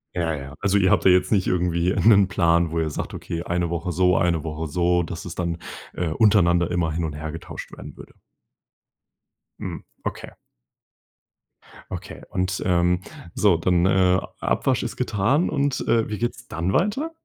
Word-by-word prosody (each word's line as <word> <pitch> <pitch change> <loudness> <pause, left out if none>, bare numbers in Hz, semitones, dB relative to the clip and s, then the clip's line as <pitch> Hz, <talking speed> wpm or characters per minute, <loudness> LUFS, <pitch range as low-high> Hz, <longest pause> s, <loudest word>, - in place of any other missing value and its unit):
Ja, 85 -2 0
ja. 70 0 -8
Also 100 0 +2
ihr 95 -2 +3
habt - - +2
da - - +7
jetzt 90 +3 +3
nicht 100 -3 +2
irgendwie 90 0 +1
'nen 100 -3 +6
Plan, 85 -2 +2
wo 80 - -1
ihr 80 - 0
sagt: 75 - -5
„Okay, 85 +1 -5
1 85 -1 -1
Woche 85 +1 -3
so, 90 0 +3
1 85 -3 +1
Woche 80 0 -4
so“, 90 +3 +1
dass 85 +1 -6
es 90 -1 -7
dann, 85 -2 -2 0.4
äh, 90 - -2
untereinander 85 -3 +3
immer 85 -2 0
hin 80 +2 -2
und 75 - -4
her 80 +1 -5
getauscht 80 +1 -8
werden - - -10
würde. - - -13 1.5
Mhm. - - -6 0.2
Okay. - - -5 1.6
Okay. - - -7
Und, 90 0 -2
ähm, 90 -1 +2 0.3
so, 100 -6 +4
dann, 90 +1 +2
äh, - - +3
A 95 -1 +3 0.2
Abwasch - - 0
ist - - -4
getan 130 - +1
und, 145 -2 0
äh, 115 -1 +3
wie 105 - -4
geht's 120 0 -3
dann 85 +3 -2
weiter? 210 - 0
90 Hz, 175 wpm, -23 LUFS, 85-95 Hz, 1.6 s, da